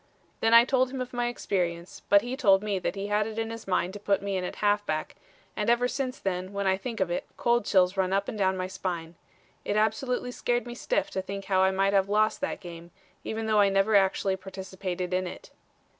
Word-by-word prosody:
Then 225 - +2
I 230 +1 +8
told 260 -1 +2
him 265 0 -5
of 255 0 -5
my 240 0 0
experience, 175 -7 -3
but 200 0 +6
he 245 +2 -3
told 200 -7 +4
me 205 -2 -1
he 195 +2 -5
had 210 +1 +1
it 220 0 -7
in 225 0 -2
his 230 -2 -8
mind 185 0 0
to 205 - -7
put 200 -1 +1
me 200 -1 -2
in 185 - -1
at 180 - -4
halfback, 205 -7 0 0.4
and 210 - -1
ever 240 +1 +3
since 260 0 -3
then, 185 0 -3
when 200 0 -2
I 190 0 +3
think 225 +3 -6
of 185 -2 0
it, 175 - -2
cold 240 -2 +2
chills 185 -1 +3
run 190 -1 0
up 195 +1 +1
and - - -4
down 190 -2 +1
my 185 - -2
spine. 175 -3 -4 0.5
It 205 - -2
absolutely 245 +4 0
scared 245 0 -1
me 240 - -6
stiff - - -1
to 190 - -2
think 195 +1 -6
how 190 -1 +2
I 190 - +5
might 195 +1 +1
have 195 0 +3
lost 215 +1 +2
that - - -3
game, 170 -2 -10 0.3
even 220 0 -3
though 215 -1 +3
I 200 -1 +5
never 195 +2 +2
actually 195 0 +2
participated 190 -1 -5
in 185 0 0
it. - - -10
200 Hz, 235 wpm, -27 LUFS, 190-225 Hz, 0.5 s, I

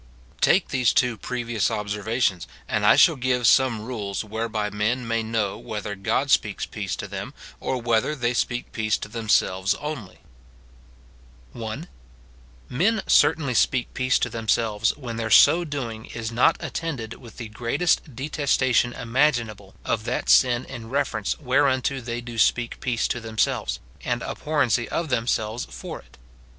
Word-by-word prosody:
Take 185 +2 +3
these 130 -4 +2
two 125 -4 +2
previous 120 -1 -2
observations, 105 -2 -1 0.2
and - - +1
I - - +7
shall - - +6
give 125 -1 0
some 115 -3 +4
rules 105 -6 -4
whereby 110 -1 -3
men 115 +4 -1
may 115 0 0
know 110 -3 -2
whether 105 -1 -5
God 95 -1 -1
speaks - - +2
peace - - -4
to - - -6
them, - - -6 0.2
or 130 - -2
whether 120 +5 +1
they 120 -3 0
speak 120 0 -2
peace 110 -1 0
to - - -7
them 110 0 -6
selves 95 -1 +2
only: 145 -10 -6 0.7
— - - -27
1. 110 -1 -6 0.8
Men 195 - +1
certainly 140 -5 +3
speak 125 +1 +1
peace 130 0 +2
to 120 - -1
themselves 110 -1 +1
when 120 -5 -6
their 115 -1 -2
so 165 +9 +7
doing 125 -8 -5
is 115 -1 -5
not 125 +8 +3
attended 130 -10 -4
with 120 -3 -13
the 115 -3 -6
greatest 130 +5 0
detestation 130 -3 +1
imaginable 115 -6 0
of 110 -1 -1
that 120 +1 -2
sin 125 -1 +4
in 115 -1 -9
reference 130 -6 -1
whereunto 135 -1 +1
they 120 0 -4
do 120 -1 -7
speak 120 +2 +2
peace 120 -3 0
to 120 - -2
themselves, 110 -1 -1 0.2
and 120 -1 -1
abhorrency 135 -7 0
of 165 -2 -2
themselves 115 -2 -1
for - - -8
it. - - -20
115 Hz, 155 wpm, -24 LUFS, 110-130 Hz, 0.8 s, I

